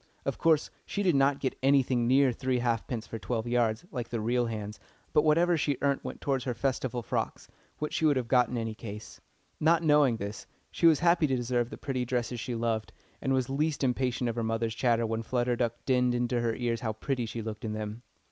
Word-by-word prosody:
Of - - -2
course 160 -2 +3 0.2
she 205 - -2
did 180 -3 +3
not 140 0 +3
get 130 - -2
anything 130 -3 +3
near 135 +1 +5
three 130 +1 -1
halfpence 120 -1 -1
for 115 - -6
twelve 115 -1 -2
yards, 120 +2 +1
like 120 -4 -4
the 115 - -2
real 120 +2 +1
"hands," 105 -2 -5 0.3
but 150 - +5
whatever 165 +3 +3
she 145 -3 0
earnt 140 -1 +1
went - - -7
towards 135 -3 -1
her 125 -2 -2
Festival 125 -1 -1
frocks, - - -3 0.3
which 150 - -4
she 160 - +1
would 145 -3 +3
have 125 -2 -2
got 125 -1 +4
in 125 - -3
any 115 -1 -2
case. 105 -1 -9 0.4
Not 165 +2 +3
knowing 150 -6 +4
this, 100 0 -6 0.2
she 170 - +3
was 155 -3 +5
happy 170 -2 +4
to 135 - +1
deserve 120 -1 0
the - - -8
pretty 130 -3 -2
dresses 120 -1 -2
she 120 +2 -3
loved, 115 -1 -1 0.3
and 135 - -1
was 130 -2 +1
least 145 +2 -1
impatient 125 -1 0
of 115 - -2
her 115 - 0
mother's 115 0 -1
chatter 115 0 +2
when 110 0 -2
Flutter 120 +1 0
Duck 120 -1 0
dinned 125 -2 +2
into 120 0 0
her 115 -1 0
ears 120 -2 -1
how 110 -2 -2
pretty 120 +2 -2
she 115 0 -5
looked 110 -1 -6
in 110 -2 -3
them. 110 +1 -5
125 Hz, 225 wpm, -29 LUFS, 115-135 Hz, 0.4 s, near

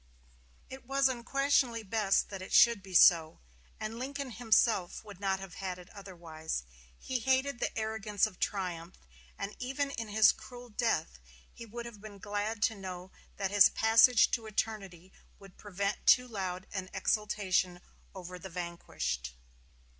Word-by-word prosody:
It 265 -2 -11
was 275 0 +3
unquestionably 255 -1 +1
best 210 -1 +1
that 195 -2 -7
it 185 - -8
should 235 -3 +6
be 190 -1 -10
so; 165 -2 +6 0.4
and 220 +2 -5
Lincoln 275 0 -5
himself 225 -5 +1
would 205 -4 -11
not 195 -1 0
have 195 -3 -9
had 185 -1 -5
it 180 0 -14
otherwise. 170 - -6 0.3
He 260 -1 -3
hated 265 +2 +1
the - - -2
arrogance 220 -2 0
of 205 -4 -8
triumph; 180 -3 -3 0.4
and 200 +1 -5
even 270 +3 -2
in 230 -4 -5
his 215 +1 +5
cruel 245 -1 -12
death 210 - -1 0.3
he 230 - -10
would 235 +2 -7
have 225 -4 -10
been 210 -1 -10
glad 205 +2 -3
to 220 - +2
know 185 -1 -8 0.3
that 195 -1 -2
his 205 -1 +7
passage 225 +2 +5
to 225 -2 -2
eternity 195 -5 -4 0.2
would 195 -2 -16
prevent 200 0 -4
too 250 0 +6
loud 190 -4 -4
an 190 -2 -4
exultation 190 -3 0 0.4
over 180 -1 -8
the 190 - -9
vanquished. 170 - -4
205 Hz, 155 wpm, -31 LUFS, 185-230 Hz, 0.4 s, his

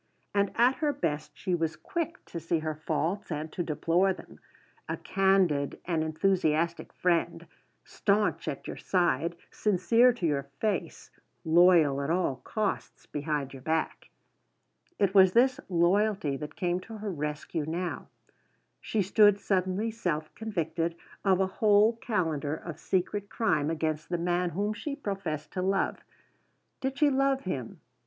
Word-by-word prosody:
And 200 -1 +2
at 245 +3 +4
her 300 -2 +1
best 155 - -2
she 185 - -3
was 165 -2 0
quick 335 +1 -4
to 170 - -6
see 165 +1 0
her 155 0 -2
faults 160 +6 -2
and 155 +1 -3
to - - -2
deplore 170 +4 +1
them; - - -14 0.5
a - - -2
candid 190 -7 +2
and 165 -3 0
enthusiastic 165 0 0
friend; 175 -2 0 0.4
staunch 205 +1 0
at - - -4
your - - -6
side, 170 -2 +1 0.2
sincere 230 +5 +4
to 230 -7 -4
your 140 -3 -1
face, 215 -2 -2 0.3
loyal 160 -4 +5
at 140 - -3
all 165 -6 +1
costs 210 - -3
behind 145 -2 -3
your 135 - -10
back. 160 +3 -2 0.9
It 195 -2 +2
was 190 -2 +6
this 255 +2 +4
loyalty 180 -2 +2
that 150 +2 -7
came 175 0 0
to 220 +4 -9
her 210 -1 -4
rescue 150 -1 -3
now: 175 +2 -3 0.7
she 215 -2 -1
stood 205 +1 +5
suddenly 195 +3 0
self 165 -8 -3
convicted 170 -6 -2 0.3
of 190 -2 +3
a 190 - +3 0.2
whole 215 +1 +5
calendar 160 - -1
of 170 -1 -8
secret 200 +2 -1
crime 160 -10 +1
against 155 -1 -2
the 175 - 0
man 175 +1 0
whom 205 +5 -1
she 280 +6 -5
professed 195 - -4
to 185 - -3
love. 195 +1 0 0.8
Did 270 +1 -3
she 290 -1 +4
love 270 0 +2
him? 135 -11 -5
180 Hz, 150 wpm, -29 LUFS, 155-205 Hz, 0.9 s, was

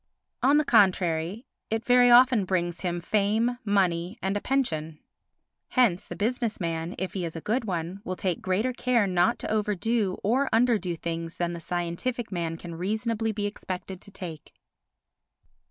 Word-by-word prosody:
On 280 +3 +5
the 305 - +2
contrary 185 -2 +2 0.2
it 225 +1 -2
very 245 0 +6
often 245 -2 +6
brings 175 -2 -1
him 175 -2 -1
fame, 215 +6 +1
money 190 -2 +1
and 195 -1 -1
a 205 - -1
pension. 160 - -1 0.7
Hence 210 -7 +2
the - - -7
business 230 +1 -1
man, 165 0 -3
if 190 - -3
he 190 - -3
is 165 -1 -4
a - - -4
good 225 +8 -1
one, 180 0 -3
will 185 - -3
take 185 -2 -2
greater 210 +7 0
care 245 -3 +2
not 180 +4 +2
to - - -4
overdo 210 -1 0
or 260 +7 +2
underdo 220 -8 +2
things 165 0 -4
than 175 0 -1
the 170 - -5
scientific 175 +9 -3
man 165 -3 -2
can 170 0 -8
reasonably 220 +5 -1
be 210 -1 -3
expected 190 -2 -5
to - - -10
take. 175 -6 -8
195 Hz, 165 wpm, -27 LUFS, 175-230 Hz, 0.7 s, very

